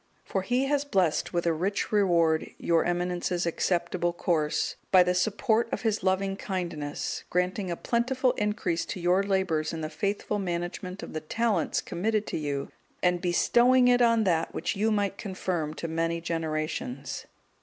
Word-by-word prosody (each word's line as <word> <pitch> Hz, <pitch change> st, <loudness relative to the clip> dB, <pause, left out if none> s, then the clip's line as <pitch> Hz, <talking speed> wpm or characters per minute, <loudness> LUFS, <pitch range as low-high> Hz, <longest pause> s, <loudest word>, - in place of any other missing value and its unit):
For 190 Hz, -, -1 dB
He 245 Hz, +7 st, +1 dB
has 285 Hz, 0 st, +1 dB
blessed 190 Hz, -, +1 dB
with 175 Hz, -1 st, -1 dB
a 170 Hz, -, +3 dB
rich 185 Hz, +6 st, -1 dB
reward 170 Hz, -6 st, +3 dB
your 165 Hz, -1 st, +2 dB
Eminence's 175 Hz, 0 st, -1 dB
acceptable 175 Hz, 0 st, 0 dB
course, 160 Hz, -3 st, 0 dB, 0.2 s
by 185 Hz, -1 st, +8 dB
the 180 Hz, 0 st, +1 dB
support 220 Hz, +5 st, +1 dB
of -, -, -3 dB
His 220 Hz, -2 st, +1 dB
loving 195 Hz, +1 st, +1 dB
kindness; 170 Hz, -8 st, -4 dB
granting 180 Hz, +2 st, 0 dB
a 170 Hz, -, -1 dB
plentiful 250 Hz, +5 st, +1 dB
increase 210 Hz, -6 st, -1 dB
to -, -, -4 dB
your 180 Hz, +2 st, +3 dB
labours 190 Hz, -6 st, 0 dB
in 160 Hz, -, -4 dB
the 155 Hz, 0 st, -4 dB
faithful 205 Hz, +1 st, -2 dB
management 180 Hz, +1 st, -4 dB
of -, -, -8 dB
the 155 Hz, -, -3 dB
talents 225 Hz, +7 st, 0 dB
committed 215 Hz, +4 st, -1 dB
to -, -, -3 dB
you, 140 Hz, -2 st, -3 dB, 0.3 s
and 180 Hz, -1 st, +2 dB
bestowing 240 Hz, +8 st, +4 dB
it 245 Hz, 0 st, +4 dB
on 230 Hz, -2 st, +4 dB
that 165 Hz, -4 st, 0 dB
which -, -, -1 dB
you 215 Hz, +3 st, +1 dB
might 205 Hz, -2 st, 0 dB
confirm 180 Hz, -6 st, -3 dB
to 165 Hz, -, -4 dB
many 165 Hz, +1 st, -1 dB
generations. 155 Hz, -5 st, -3 dB
180 Hz, 165 wpm, -28 LUFS, 170-210 Hz, 0.3 s, by